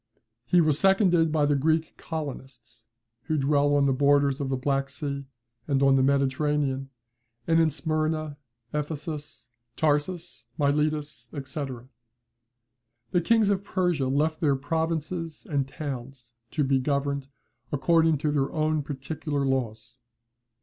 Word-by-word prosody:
He 175 +4 +5
was 155 -2 +3
seconded 185 -5 +4
by 150 -2 +2
the 145 - +2
Greek 160 +3 +1
colonists, 130 -7 -7 0.4
who 155 -1 0
dwelt 145 +1 +2
on 145 -1 +4
the 135 - +3
borders 140 +1 +3
of 135 - -2
the 135 - 0
Black 135 +1 0
Sea, 140 -1 -5 0.4
and 140 -1 +2
on 135 0 +5
the 135 - +4
Mediterranean, 140 0 +1 0.6
and 165 0 +3
in 165 -1 +4
Smyrna, 155 -1 -1 0.4
Ephesus, 150 -2 -5 0.3
Tarsus, 155 -4 -1
Miletus, 150 +1 0 0.2
&c. 140 +2 -4 1.5
The 175 - +2
kings 215 +3 +3
of 195 0 0
Persia 175 -8 0
left 155 +5 0
their 145 -4 +3
provinces 160 +2 -3
and 140 -3 0
towns 135 -4 -7 0.2
to 150 - 0
be 135 -1 +2
governed 140 0 -1 0.4
according 160 +2 +3
to 150 - +3
their 140 -2 0
own 155 -1 +1
particular 145 +1 -3
laws. 120 -2 -2
145 Hz, 130 wpm, -26 LUFS, 135-160 Hz, 1.5 s, He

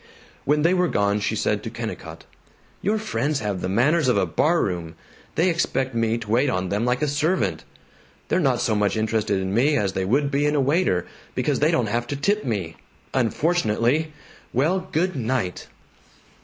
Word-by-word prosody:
When 150 +1 +2
they 170 +2 +4
were 180 -1 +2
gone 100 -6 +1
she 105 - -1
said - - 0
to - - -5
Kennicott, - - -7 0.6
"Your 210 +4 +1
friends 155 -9 -1
have 100 -3 -2
the 90 - -2
manners 135 - +3
of 125 - +3
a 95 - +3
barroom. 90 - 0 0.4
They 170 - +3
expect 135 -6 0
me 115 0 +1
to 115 -2 -8
wait 130 +5 +3
on 95 -6 -1
them 105 +4 0
like 125 +3 0
a - - +2
servant. 140 - 0 0.6
They're - - +1
not 135 -7 +2
so 110 - +1
much 105 0 +1
interested 110 -2 0
in 95 0 -2
me 140 +7 +3
as 100 -5 0
they 95 - -1
would 140 +7 +1
be 145 +1 +2
in 150 - +1
a - - +2
waiter, 140 - +2 0.3
because - - 0
they - - +3
don't 125 - +2
have 120 +3 -1
to 145 - -3
tip 205 +9 0
me. 95 -9 -3 0.4
Unfortunately! 135 - +1 0.4
Well, 180 +9 +1
good 180 +4 0
night." 120 -7 -2
125 Hz, 185 wpm, -23 LUFS, 105-150 Hz, 0.6 s, they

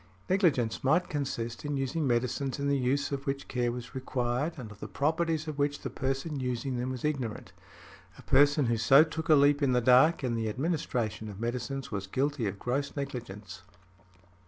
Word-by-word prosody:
Negligence 160 - +1
might 155 +7 +2
consist 120 -5 -3
in 145 -1 -2
using 135 +3 -1
medicines 125 +3 0
in 140 0 -2
the 140 - +2
use 140 +2 0
of 140 +1 -4
which 140 0 -2
care 120 -1 0
was 120 +1 -7
required, 130 +3 -1
and 120 -5 -8
of 105 - -13
the - - -6
properties 160 +1 0
of 150 -2 -5
which 145 0 0
the 130 - -5
person 135 +3 -2
using 125 +1 -2
them 125 +1 -2
was 130 +1 -4
ignorant. 130 -8 -3 0.6
A - - -13
person 145 +1 +4
who 115 -1 +1
so 135 +7 +7
took 160 0 -5
a 155 - +8
leap 145 +1 +4
in 135 -3 +3
the 125 - +4
dark 130 +6 +5
in 125 -2 0
the 115 -1 -1
administration 125 -5 -2
of 100 -1 -9
medicines, 125 +3 -3
was 100 -2 -4
guilty 135 +1 -1
of 100 0 -4
gross 135 +6 -2
negligence. 120 -10 -6
135 Hz, 190 wpm, -29 LUFS, 120-145 Hz, 0.6 s, a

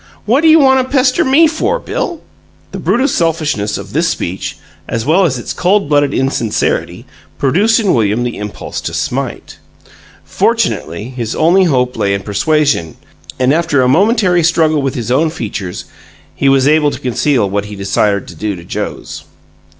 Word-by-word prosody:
What 255 +8 +2
you 320 0 +7
want 265 -3 +4
to 255 - -11
pester 260 -2 +2
ME 275 +5 +4
for, 350 +10 0
Bill?" 350 -8 -4 0.5
The - - -6
brutal 260 +3 +1
selfishness 155 - -1
of - - -9
this 165 +4 +1
speech, 95 - -4 0.3
as 115 -1 -3
well 175 +6 +3
as 135 -7 0
its 120 - -5
cold 190 -2 +1
blooded 145 -1 +2
insincerity, 130 -5 -1 0.3
produced 200 - +2
in 205 -5 +1
William 110 +1 +1
the 120 -1 -4
impulse 105 0 -6
to - - -5
smite. - - -4 0.7
Fortunately, 95 +8 -1
his 120 -3 -4
only 180 +4 +3
hope 125 -6 0
lay 100 0 0
in 100 - -5
persuasion, 140 - 0 0.4
and 130 +2 +2
after 160 -5 +1
a - - +2
momentary 185 - +3
struggle 160 -2 +2
with 135 -1 -2
his 120 -1 -4
own 155 +5 +2
features 105 - -6 0.5
he 140 - +1
was 135 0 +3
able 150 0 +3
to - - -6
conceal 125 -2 0
what 100 +1 -2
he 105 0 -8
desired 100 0 0
to - - -9
do 105 +4 -3
to 85 - -11
Joe's. 85 - -6
145 Hz, 170 wpm, -14 LUFS, 110-185 Hz, 0.7 s, you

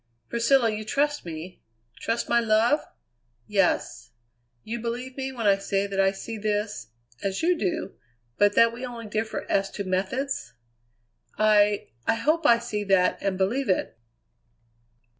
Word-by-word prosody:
"Priscilla, 235 0 +3
you 215 0 -4
trust 290 +5 0
me; 165 +2 -8 0.4
trust 230 +1 -1
my 235 - +3
love?" 230 +5 +3 0.6
"Yes." 180 - 0 0.5
"You 235 +2 -4
believe 245 +3 -4
me 265 -1 -3
when 235 -4 -5
I 200 -1 +4
say 195 0 0
that 200 -1 -4
I 195 0 +5
see 220 +3 -7
this 210 - -2 0.3
as 195 +7 -2
you 355 +2 +4
do 195 - -2 0.4
but 205 +5 +3
that 230 0 +5
we 240 +2 -8
only 240 -2 -6
differ 220 +1 -3
as 195 0 +1
to 200 - -5
methods?" 195 - -2 0.8
"I 210 -1 +3 0.2
I 225 - +3
hope 310 +9 +1
I 235 - +7
see 225 -3 -3
that 190 -2 +3
and 195 -1 -1
believe 225 +8 0
it." 185 - 0
215 Hz, 150 wpm, -26 LUFS, 195-235 Hz, 0.8 s, I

